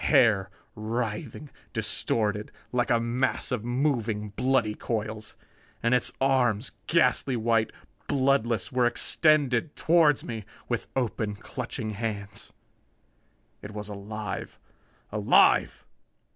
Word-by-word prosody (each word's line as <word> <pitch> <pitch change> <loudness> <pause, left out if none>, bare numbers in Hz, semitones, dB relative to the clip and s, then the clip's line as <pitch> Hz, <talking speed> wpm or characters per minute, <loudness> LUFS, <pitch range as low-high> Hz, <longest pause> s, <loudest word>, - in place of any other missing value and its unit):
Hair 95 -5 +4 0.2
writhing, 115 +5 -4 0.2
distorted 105 -2 0 0.2
like 125 -1 +1
a 120 - +4
mass 120 +3 -1
of 125 -4 -1
moving, 120 -5 0
bloody 120 +1 +1
coils. 110 -1 -4 0.5
And 115 +1 +3
its 125 - +3
arms, 130 -4 +2 0.2
ghastly 135 -4 +2
white, 115 -1 +1 0.4
bloodless, 130 -6 +1
were 125 -1 +3
extended 145 +1 +2
toward 160 -4 +4
me, 115 -3 -5 0.2
with 120 -2 -2
open, 110 -4 -1
clutching 115 +1 -5
hands. 105 -1 -5 1.1
It 105 - -8
was 105 0 -5
alive! 105 +1 -6 0.5
Alive! 105 -1 +4
115 Hz, 105 wpm, -27 LUFS, 105-125 Hz, 1.1 s, Hair